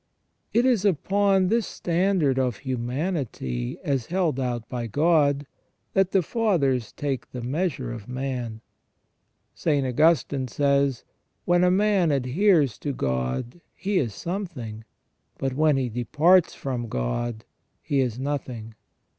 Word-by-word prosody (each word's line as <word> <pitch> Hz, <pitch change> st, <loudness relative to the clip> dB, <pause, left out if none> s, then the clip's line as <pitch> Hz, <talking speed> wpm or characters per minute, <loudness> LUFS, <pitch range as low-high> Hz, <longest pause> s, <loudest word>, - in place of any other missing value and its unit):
It 235 Hz, +2 st, +3 dB
is 240 Hz, -7 st, +3 dB
upon 195 Hz, +1 st, +2 dB
this 230 Hz, 0 st, +1 dB
standard 170 Hz, -6 st, +1 dB
of 125 Hz, -5 st, 0 dB
humanity, 125 Hz, -, -2 dB
as 135 Hz, -5 st, -1 dB
held 170 Hz, -6 st, 0 dB
out 120 Hz, -3 st, -2 dB
by 120 Hz, -2 st, -4 dB
God, 145 Hz, +2 st, +2 dB, 0.5 s
that 195 Hz, -2 st, +3 dB
the 190 Hz, -2 st, +2 dB
Fathers 150 Hz, -, +1 dB
take 140 Hz, -3 st, -3 dB
the 125 Hz, -2 st, -6 dB
measure 135 Hz, -2 st, -2 dB
of 115 Hz, -4 st, -8 dB
man. 125 Hz, -3 st, -4 dB, 0.9 s
St. 145 Hz, -4 st, 0 dB
Augustine 140 Hz, 0 st, +2 dB
says: 140 Hz, 0 st, +1 dB, 0.2 s
" -, -, -48 dB
When 175 Hz, 0 st, +3 dB
a 180 Hz, -, +5 dB
man 195 Hz, -2 st, +3 dB
adheres 145 Hz, -, +2 dB
to 145 Hz, -, -3 dB
God 65 Hz, -, -2 dB
he 195 Hz, +1 st, 0 dB
is 115 Hz, -7 st, -2 dB
something; 150 Hz, -, -5 dB, 0.5 s
but 135 Hz, -1 st, -2 dB
when 150 Hz, 0 st, +3 dB
he 130 Hz, -2 st, 0 dB
departs 150 Hz, +10 st, +3 dB
from 125 Hz, -3 st, -3 dB
God 110 Hz, -, -2 dB, 0.4 s
he 145 Hz, -3 st, 0 dB
is 125 Hz, -3 st, 0 dB
nothing". 130 Hz, -5 st, -4 dB
140 Hz, 130 wpm, -25 LUFS, 120-175 Hz, 0.9 s, a